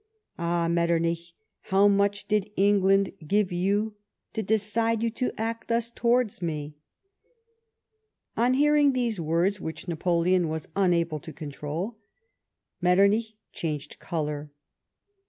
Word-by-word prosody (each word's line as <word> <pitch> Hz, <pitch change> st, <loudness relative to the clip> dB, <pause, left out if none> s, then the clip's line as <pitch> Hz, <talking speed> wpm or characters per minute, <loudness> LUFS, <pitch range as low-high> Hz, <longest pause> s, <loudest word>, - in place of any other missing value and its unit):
Aii! 170 Hz, 0 st, 0 dB
Metternicli, 170 Hz, 0 st, 0 dB, 0.3 s
how 195 Hz, +1 st, +4 dB
mucii 200 Hz, 0 st, +1 dB
did 210 Hz, -1 st, +1 dB
England 195 Hz, 0 st, +3 dB, 0.2 s
give 200 Hz, +1 st, +2 dB
you 205 Hz, +4 st, 0 dB, 0.4 s
to 220 Hz, -, -1 dB
decide 220 Hz, +2 st, 0 dB
you 230 Hz, -, +1 dB
to 250 Hz, +2 st, -1 dB
act 230 Hz, +1 st, -3 dB
thus 230 Hz, 0 st, 0 dB
towards 235 Hz, -4 st, +1 dB
me? 150 Hz, -3 st, -3 dB, 0.8 s
" 455 Hz, -, -50 dB, 0.7 s
On 245 Hz, +2 st, +2 dB
hearing 295 Hz, 0 st, +4 dB
these 240 Hz, -6 st, 0 dB
words, 170 Hz, +5 st, +1 dB
which 160 Hz, +3 st, -6 dB
Napoleon 175 Hz, +1 st, +1 dB
was 160 Hz, -1 st, -4 dB
unable 170 Hz, -5 st, +1 dB
to 160 Hz, -, -9 dB
control, 155 Hz, +8 st, -5 dB, 0.8 s
Metternich 200 Hz, +5 st, +3 dB, 0.2 s
changed 150 Hz, -3 st, -4 dB
colour. 150 Hz, -2 st, -3 dB
195 Hz, 120 wpm, -27 LUFS, 170-220 Hz, 0.8 s, how